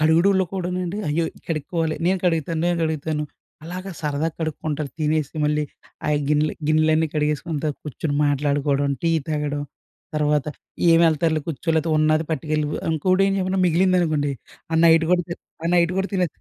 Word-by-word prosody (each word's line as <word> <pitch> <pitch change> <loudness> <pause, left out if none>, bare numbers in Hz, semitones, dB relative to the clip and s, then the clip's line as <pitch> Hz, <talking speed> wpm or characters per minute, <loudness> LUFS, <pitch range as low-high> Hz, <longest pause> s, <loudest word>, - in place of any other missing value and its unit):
కడుగుడూల్లో 175 +5 +4
కూడానండి 180 +1 -2
అయ్యో! 165 +3 +1 0.2
కడుక్కోవాలి. 160 +1 -1
నేను 190 +1 +2
కడుగుతాను, 165 -1 0
నేను 175 -1 +1
కడుగుతాను, 155 -1 -1 0.4
అలాగా 185 +3 -6
సరదాగా 150 +2 0
కడుక్కుంటారు 155 -2 -3
తినేసి 155 -1 0
మళ్ళీ. 150 0 +1 0.4
ఆయ 150 - +3
గిన్నెలు 150 0 +2
గిన్నెలన్నీ 155 0 +3
కడిగేసుకుంటా 150 0 -1 0.2
కుర్చొని 150 0 -3
మాట్లాడుకోవడం, 145 0 +1
టీ 165 - +3 0.2
తాగడం, 150 -1 -1 0.5
తర్వాత 150 -1 +1 0.5
ఏం 165 - +5
ఎళ్తారులే 155 -1 +1
కుర్చో. 165 +1 -5
లేతే 160 +1 +1
ఉన్నాది 155 +1 +3
పట్టుకెళ్ళిపో. 155 0 -1 0.2
ఇంకోటి 185 +5 +2
ఏంచేప్పన 190 -1 0
మిగిలిందనుకోండి. 170 -4 +2 0.4
ఆ - - +1
నైట్ 165 0 +5
కూడా 180 -1 +3
తి - - -1 0.3
ఆ - - +1
నైట్ 170 0 +3
కూడా 190 +1 0
తినో. 185 -1 +2
155 Hz, 145 wpm, -23 LUFS, 150-170 Hz, 0.5 s, ఏం